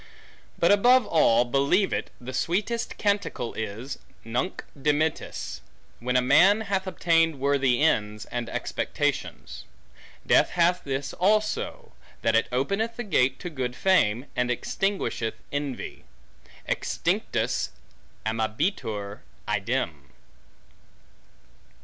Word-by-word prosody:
But, -, -, +4 dB
above 245 Hz, +4 st, +5 dB
all, 120 Hz, -7 st, +4 dB
believe 140 Hz, +10 st, +2 dB
it, -, -, -2 dB
the 125 Hz, +1 st, -7 dB
sweetest 210 Hz, -, -1 dB
canticle 200 Hz, -, -1 dB
is', 110 Hz, +5 st, -5 dB, 0.3 s
Nunc 125 Hz, +11 st, -2 dB
dimittis; 150 Hz, +2 st, -1 dB, 0.4 s
when 125 Hz, +1 st, -2 dB
a 125 Hz, -, +3 dB
man 200 Hz, -, +5 dB
hath 195 Hz, -3 st, -1 dB
obtained 165 Hz, -4 st, +2 dB
worthy 140 Hz, -1 st, +2 dB
ends, 105 Hz, -8 st, +1 dB
and 120 Hz, -1 st, -4 dB
expectations. -, -, -3 dB, 0.6 s
Death -, -, +4 dB
hath 175 Hz, +1 st, +3 dB
this 135 Hz, 0 st, -3 dB
also; 215 Hz, +3 st, 0 dB, 0.3 s
that 115 Hz, -, +3 dB
it 115 Hz, -, +3 dB
openeth 195 Hz, -, 0 dB
the 240 Hz, -, -4 dB
gate 135 Hz, -, +2 dB
to 175 Hz, -, -4 dB
good 125 Hz, -4 st, -3 dB
fame, 130 Hz, -, +2 dB
and 125 Hz, -1 st, +1 dB
extinguisheth 125 Hz, -, -1 dB, 0.2 s
envy. 145 Hz, -3 st, -4 dB, 0.6 s
Extinctus -, -, -1 dB, 0.6 s
amabitur 110 Hz, -, -2 dB, 0.3 s
idem. 100 Hz, -, -2 dB
140 Hz, 105 wpm, -26 LUFS, 120-190 Hz, 0.6 s, above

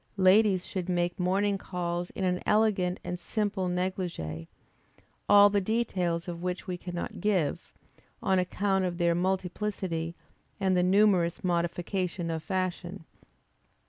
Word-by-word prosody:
Ladies 190 Hz, 0 st, +4 dB
should 185 Hz, -1 st, -4 dB
make 175 Hz, 0 st, 0 dB
morning 195 Hz, +2 st, +1 dB
calls 175 Hz, -1 st, -3 dB
in 195 Hz, -, -3 dB
an 180 Hz, -1 st, 0 dB
elegant 200 Hz, -4 st, +2 dB
and 180 Hz, 0 st, -4 dB
simple 205 Hz, 0 st, -1 dB
négligé, 180 Hz, -, -3 dB, 0.8 s
all 205 Hz, 0 st, +9 dB
the 200 Hz, 0 st, +2 dB
details 185 Hz, -6 st, -1 dB
of 170 Hz, -1 st, -5 dB
which 180 Hz, 0 st, -3 dB
we 180 Hz, -, -3 dB
cannot 175 Hz, -1 st, -6 dB
give, 180 Hz, -5 st, 0 dB, 0.5 s
on 190 Hz, -4 st, +2 dB
account 195 Hz, +1 st, 0 dB
of 175 Hz, -2 st, -2 dB
their 170 Hz, -1 st, +2 dB
multiplicity 180 Hz, -2 st, -2 dB, 0.4 s
and 190 Hz, -2 st, +2 dB
the 180 Hz, -, +3 dB
numerous 185 Hz, -2 st, +3 dB
modification 175 Hz, 0 st, -1 dB
of 160 Hz, -1 st, -3 dB
fashion. 185 Hz, -1 st, -3 dB
180 Hz, 130 wpm, -29 LUFS, 175-195 Hz, 0.8 s, all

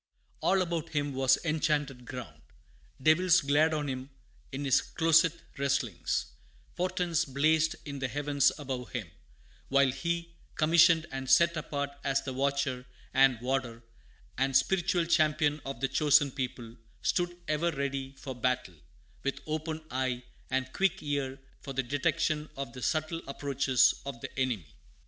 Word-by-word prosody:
All 190 Hz, -1 st, +3 dB
about 165 Hz, -2 st, -4 dB
him 145 Hz, -1 st, 0 dB
was 130 Hz, 0 st, +4 dB
enchanted 150 Hz, -5 st, 0 dB
ground; 125 Hz, -2 st, -8 dB, 0.6 s
devils 165 Hz, +6 st, +5 dB
glared 145 Hz, +3 st, +3 dB
on 150 Hz, -2 st, -1 dB
him 130 Hz, 0 st, -4 dB, 0.4 s
in 140 Hz, +1 st, -4 dB
his 135 Hz, -, +4 dB
"closet 165 Hz, 0 st, +2 dB, 0.2 s
wrestlings;" 140 Hz, -1 st, -1 dB, 0.4 s
portents 180 Hz, -2 st, 0 dB
blazed 155 Hz, +3 st, +2 dB
in 140 Hz, -2 st, -6 dB
the 135 Hz, -, -1 dB
heavens 145 Hz, +1 st, +2 dB
above 130 Hz, -4 st, -5 dB
him; 105 Hz, -10 st, -4 dB, 0.6 s
while 140 Hz, -1 st, +4 dB
he, 170 Hz, +3 st, -3 dB, 0.2 s
commissioned 165 Hz, 0 st, +5 dB
and 135 Hz, -1 st, -5 dB
set 170 Hz, +5 st, +5 dB
apart 145 Hz, -2 st, -3 dB
as 135 Hz, -1 st, +1 dB
the 130 Hz, -, -4 dB
watcher, 135 Hz, -1 st, -1 dB, 0.3 s
and 135 Hz, -3 st, +5 dB
warder, 125 Hz, -2 st, -2 dB, 0.6 s
and 135 Hz, 0 st, +4 dB
spiritual 175 Hz, +3 st, +1 dB
champion 155 Hz, -3 st, +2 dB
of 135 Hz, -, -6 dB
"the 135 Hz, -, +2 dB
chosen 145 Hz, +1 st, +4 dB
people," 125 Hz, -3 st, -5 dB, 0.3 s
stood 175 Hz, -1 st, 0 dB
ever 155 Hz, +3 st, +1 dB
ready 135 Hz, -2 st, -3 dB
for 135 Hz, -, -6 dB
battle, 125 Hz, -5 st, -1 dB, 0.5 s
with 140 Hz, -, -2 dB
open 155 Hz, 0 st, -3 dB
eye 130 Hz, -1 st, -1 dB, 0.3 s
and 130 Hz, 0 st, -1 dB
quick 195 Hz, -3 st, +1 dB
ear 140 Hz, -2 st, -2 dB, 0.2 s
for 135 Hz, -, -7 dB
the 135 Hz, 0 st, 0 dB
detection 150 Hz, +4 st, 0 dB
of 135 Hz, -4 st, -5 dB
the 125 Hz, -, -9 dB
subtle 155 Hz, +4 st, -1 dB
approaches 140 Hz, -2 st, +2 dB
of 140 Hz, -4 st, -6 dB
the 135 Hz, 0 st, -7 dB
enemy. 120 Hz, -10 st, 0 dB
140 Hz, 145 wpm, -30 LUFS, 130-155 Hz, 0.6 s, devils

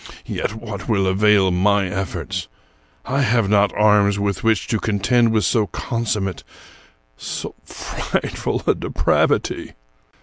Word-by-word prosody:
Yet 105 Hz, -, -3 dB
what 110 Hz, -2 st, -7 dB
will 100 Hz, -4 st, +2 dB
avail 95 Hz, 0 st, +3 dB
my 100 Hz, +2 st, +2 dB
efforts? 95 Hz, +1 st, -4 dB, 0.6 s
I 135 Hz, +2 st, 0 dB
have 115 Hz, -4 st, +2 dB
not 100 Hz, -1 st, +4 dB
arms 105 Hz, -1 st, +4 dB
with 100 Hz, -1 st, -2 dB
which 110 Hz, -3 st, +1 dB
to 110 Hz, -, +1 dB
contend 115 Hz, +3 st, +2 dB
with 110 Hz, -4 st, +2 dB
so 105 Hz, +5 st, +2 dB
consummate, 110 Hz, -7 st, -3 dB, 0.7 s
so -, -, -5 dB
frightful -, -, -3 dB
a -, -, +4 dB
depravity. -, -, 0 dB
105 Hz, 125 wpm, -20 LUFS, 100-110 Hz, 0.7 s, not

